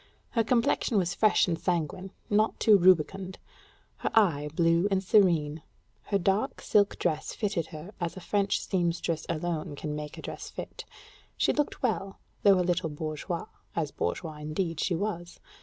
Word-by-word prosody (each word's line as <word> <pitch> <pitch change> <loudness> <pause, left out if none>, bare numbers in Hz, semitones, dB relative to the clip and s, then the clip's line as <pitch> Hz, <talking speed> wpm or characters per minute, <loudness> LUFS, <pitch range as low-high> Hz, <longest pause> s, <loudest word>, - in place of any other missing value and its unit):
Her 230 - +2
complexion 230 -1 +2
was 180 -2 +1
fresh 215 0 +4
and 165 -2 -1
sanguine, 180 +2 -2 0.2
not 215 +1 +2
too 215 - +6
rubicund; 185 +1 +3 0.6
her - - -2
eye, 160 -9 +3
blue 170 +2 +3
and 195 -1 +1
serene; 165 -7 +3 0.4
her 200 - +1
dark 195 +3 0
silk 205 -1 +2
dress 155 -3 -1
fitted 195 -7 -1
her 160 +6 -9
as 170 0 -3
a - - -5
French 200 +2 0
sempstress 170 -3 -1
alone 160 -2 -2
can 150 +1 -4
make 150 0 -6
a - - -9
dress - - -6
fit; - - -8 0.5
she - - +2
looked 295 -2 -2
well, 195 -5 -1 0.2
though 195 -2 +6
a 180 - +1
little 175 -2 0
bourgeoise, 155 +3 -4 0.3
as 155 -4 -1
bourgeoise 155 -4 -3
indeed 165 +2 -2
she 180 - +1
was. 175 -2 -4
175 Hz, 160 wpm, -28 LUFS, 160-195 Hz, 0.6 s, too